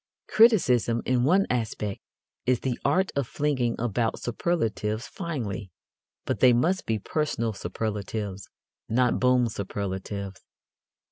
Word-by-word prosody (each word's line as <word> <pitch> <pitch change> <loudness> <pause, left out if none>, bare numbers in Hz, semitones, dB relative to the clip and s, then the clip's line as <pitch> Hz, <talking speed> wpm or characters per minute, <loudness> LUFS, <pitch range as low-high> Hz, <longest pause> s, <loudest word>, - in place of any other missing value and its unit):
Criticism, 125 - +4
in 125 -1 +2
one 190 +7 +4
aspect, 110 -4 -2 0.5
is 125 -2 +2
the 130 -3 -2
art 190 +1 +2
of 140 -4 0
flinging 130 -6 0
about 115 -1 0
superlatives 115 -5 -1
finely. 115 - -4 0.6
But - - -1
they 125 -1 +6
must 170 +11 +1
be 110 - +1
personal 115 -2 -1
superlatives, 100 0 -4 0.4
not 125 +2 +2
boom 125 -1 +4
superlatives. 100 -1 -5
120 Hz, 115 wpm, -26 LUFS, 105-130 Hz, 0.6 s, they